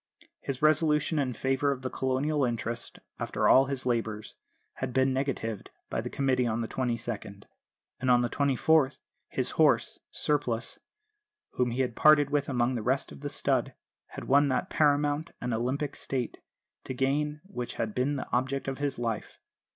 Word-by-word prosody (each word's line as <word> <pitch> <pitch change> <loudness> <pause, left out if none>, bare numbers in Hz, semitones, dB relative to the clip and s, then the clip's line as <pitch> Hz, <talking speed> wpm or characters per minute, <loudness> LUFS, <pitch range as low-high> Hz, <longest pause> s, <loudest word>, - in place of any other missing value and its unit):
His 135 +1 -5
resolution 155 0 +3
in 130 -3 0
favour 135 +3 +1
of 130 -2 -4
the 130 - -2
Colonial 135 +3 0
interest, 120 -1 -3 0.2
after - - 0
all 135 - +7
his 135 -2 -2
labours, 110 -3 -2 0.4
had 130 -1 -3
been 130 +1 +3
negatived 130 -6 -2 0.2
by - - -1
the - - -5
Committee 130 -3 +1
on 115 +1 -1
the 115 - -2
22nd; 115 -5 -3 0.6
and 130 - -1
on 125 -1 +6
the 120 - +1
24th, 140 0 +2 0.3
his - - -2
horse, - - +3
Surplice, 130 -6 -1 0.7
whom 125 -1 0
he 120 +3 -1
had 120 -2 -3
parted 150 -2 +5
with 145 -1 +1
among 125 -1 +1
the 120 - -2
rest 130 +5 0
of 70 - -10
the - - -3
stud, - - 0 0.3
had - - -8
won 140 +2 +4
that 130 -2 -1
paramount 145 +1 +2
and 125 -1 -2
Olympic 130 +5 -1
stake, 125 -4 -4 0.4
to 130 - -5
gain 150 +3 0
which 155 -11 -6
had 110 -2 -2
been 130 +5 0
the 135 - -4
object 135 +3 0
of 135 0 -3
his 145 -1 -1
life. 115 -2 -3
130 Hz, 170 wpm, -29 LUFS, 120-145 Hz, 0.7 s, all